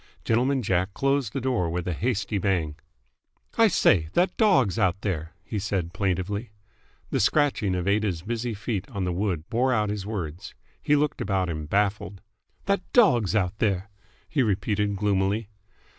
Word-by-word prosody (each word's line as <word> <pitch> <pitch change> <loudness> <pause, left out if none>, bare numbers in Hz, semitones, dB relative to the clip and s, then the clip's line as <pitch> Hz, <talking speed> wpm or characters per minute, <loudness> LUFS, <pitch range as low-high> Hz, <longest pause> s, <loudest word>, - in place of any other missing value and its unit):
Gentleman 125 +3 +1
Jack 95 0 0
closed 135 -4 +1
the 135 - -3
door 120 -9 0
with 85 +1 -3
a 90 - 0
hasty 105 +1 -1
bang. 90 -6 0 0.8
"I 225 - +6
say 85 - +3
that 180 +2 +2
dog's 130 - +3
out 95 -2 +2
there!" 85 -5 -3
he 105 - -4
said 95 -4 -2
plaintively. 100 +3 -2 0.6
The - - +1
scratching 130 -10 +2
of 90 +1 -2
Aida's 100 -5 0
busy 115 +2 -3
feet 100 -1 -4
on 100 -7 -3
the 90 -1 -1
wood 90 -4 -2
bore 125 +3 +1
out 105 -4 +1
his 105 -2 -3
words. 90 -6 -5 0.3
He 150 - +3
looked 150 0 0
about 95 -2 0
him, 75 -2 -4
baffled. 100 0 0 0.5
"That 200 -2 +1
dog's 125 - +4
out 100 0 0
there!" 100 -1 0 0.4
he 145 - 0
repeated 105 -1 0
gloomily. 100 +1 0
100 Hz, 160 wpm, -26 LUFS, 95-120 Hz, 0.8 s, I